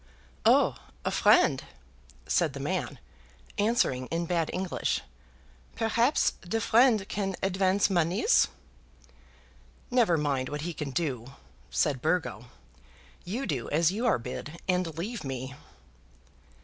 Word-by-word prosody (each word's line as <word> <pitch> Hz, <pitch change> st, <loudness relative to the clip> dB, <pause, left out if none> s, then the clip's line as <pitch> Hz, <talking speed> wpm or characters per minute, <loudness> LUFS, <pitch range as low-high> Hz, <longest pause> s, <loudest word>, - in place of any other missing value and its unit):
"Oh! -, -, +4 dB, 0.3 s
a -, -, +1 dB
friend," -, -, +4 dB, 0.6 s
said -, -, +1 dB
the -, -, -6 dB
man, -, -, -2 dB, 0.6 s
answering 205 Hz, -, +1 dB
in 170 Hz, +1 st, -2 dB
bad 165 Hz, -2 st, 0 dB
English. 185 Hz, 0 st, -1 dB, 0.7 s
"Perhaps 230 Hz, +4 st, +2 dB
de 185 Hz, +5 st, -2 dB
friend 225 Hz, -3 st, +4 dB
can 195 Hz, -2 st, -2 dB
advance 190 Hz, +1 st, +2 dB
moneys?" 175 Hz, -1 st, +3 dB, 1.4 s
"Never 230 Hz, -9 st, +4 dB
mind 140 Hz, -4 st, -1 dB
what 150 Hz, 0 st, -4 dB
he 175 Hz, +2 st, -3 dB
can 150 Hz, -2 st, -4 dB
do," 135 Hz, -4 st, -3 dB, 0.4 s
said 140 Hz, -5 st, 0 dB
Burgo. 160 Hz, -8 st, -1 dB, 0.8 s
"You 230 Hz, +10 st, -3 dB
do 130 Hz, -6 st, -3 dB
as 165 Hz, +3 st, +3 dB
you 225 Hz, +5 st, -1 dB
are -, -, +4 dB
bid, 135 Hz, +7 st, -7 dB
and 180 Hz, -4 st, 0 dB
leave 210 Hz, +6 st, -4 dB
me." 130 Hz, -1 st, -5 dB
175 Hz, 120 wpm, -28 LUFS, 145-205 Hz, 1.4 s, Oh